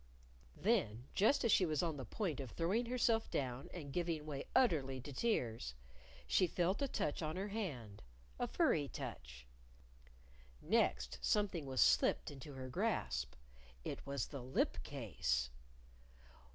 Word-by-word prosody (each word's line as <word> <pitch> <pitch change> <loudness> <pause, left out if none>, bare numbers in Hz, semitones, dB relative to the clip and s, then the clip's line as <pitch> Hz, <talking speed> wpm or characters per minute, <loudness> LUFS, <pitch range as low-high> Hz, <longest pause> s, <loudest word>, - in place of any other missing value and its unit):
Then, 140 - +1
just 240 +7 +4
as 230 - +4
she - - +6
was 155 -2 +1
on 165 -3 0
the 130 - -5
point 170 - -2
of 135 -3 -4
throwing 195 - 0
herself 235 -2 +2
down 130 -1 -2
and 145 -6 -7
giving 165 -3 -1
way 140 -3 -4
utterly 140 - +3
to 140 +3 -7
tears, 115 - 0 0.5
she 185 - +4
felt 180 - +1
a 280 - +2
touch 150 - -1
on 155 0 -2
her 195 +3 -2
hand 135 - -4 0.4
a - - +1
furry 145 -2 +2
touch. 60 - -7 1.1
Next, - - +1
something 195 -8 +1
was 130 -1 +1
slipped - - +4
into 140 +1 -9
her 130 -1 -6
grasp. 65 - -1 0.5
It - - -4
was 140 0 -1
the 140 -3 -7
lip 130 +2 0
case! 65 - -1
145 Hz, 145 wpm, -38 LUFS, 125-190 Hz, 1.1 s, she